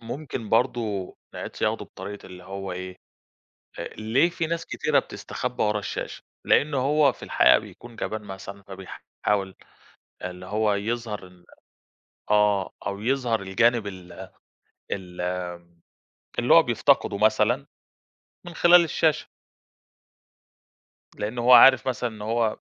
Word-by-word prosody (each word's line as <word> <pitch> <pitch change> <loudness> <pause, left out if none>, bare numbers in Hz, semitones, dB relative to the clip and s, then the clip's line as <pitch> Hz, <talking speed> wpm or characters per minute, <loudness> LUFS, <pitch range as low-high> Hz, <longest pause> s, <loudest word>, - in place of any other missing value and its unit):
ممكن 120 -1 -6
برضه 110 -5 0 0.2
نعيد - - -7
صياغته - - -1
بطريقة 100 +2 -9
اللي 90 -1 -12
هو 95 -1 -6
إيه؟ 95 0 -7 1.0
ليه 115 +10 +2
في 165 -2 -3
ناس 170 0 -3
كثيرة - - +1
بتستخبّى - - -4
ورا 105 0 +1
الشاشة؟ - - -6 0.2
لأنه 145 -1 +3
هو 140 +1 +3
في - - -14
الحقيقة - - +5
بيكون 120 -1 -13
جبان 110 0 -4
مثلًا 100 0 -9
فبيحاول 95 0 -4 0.7
اللي 90 0 -7
هو 105 +1 +1
يظهر 110 -1 -3
ال 90 -1 -20 0.8
آه، 105 -2 +3
أو 100 0 -3
يظهر 120 -2 0
الجانب 110 +4 +2
ال 95 -3 -9 0.6
ال 90 -2 -5
آآ 90 -1 -5 0.6
اللي - - +4
هو - - +8
بيفتقده 100 - +2
مثلًا 110 +1 +2 0.8
من 175 - -8
خلال 175 0 +7
الشاشة. 160 -1 +1 1.9
لأنه 115 +3 -3
هو 125 - +5
عارف 130 0 +8
مثلًا 120 -1 -2
إن 105 -1 -10
هو 110 0 0
105 Hz, 125 wpm, -25 LUFS, 95-120 Hz, 1.9 s, هو